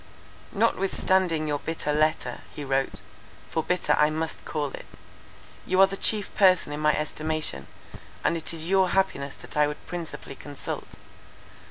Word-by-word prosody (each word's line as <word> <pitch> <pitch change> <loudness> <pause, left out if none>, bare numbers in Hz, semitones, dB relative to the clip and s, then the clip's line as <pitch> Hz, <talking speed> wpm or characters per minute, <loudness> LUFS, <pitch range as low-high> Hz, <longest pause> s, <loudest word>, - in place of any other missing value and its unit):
"Notwithstanding 190 -6 +2
your 145 -1 0
bitter 160 -2 -2
letter," 155 +1 +1
he 150 - -7
wrote, 135 0 0 0.6
"for 160 - +1
bitter 180 +3 +1
I 150 - +6
must 160 +1 -3
call 150 -3 -2
it, - - -9 0.8
you 185 +1 +2
are 195 - +10
the 195 0 -4
chief 210 +1 0
person 185 -6 +4
in 145 - -4
my 150 0 +3
estimation, 155 - -2 0.6
and - - +2
it 165 - -3
is 160 -1 -4
your 190 0 +4
happiness 175 -8 0
that - - -12
I 150 0 +4
would 150 - -6
principally 170 -5 -6
consult. 145 0 -6
160 Hz, 155 wpm, -27 LUFS, 150-185 Hz, 0.8 s, are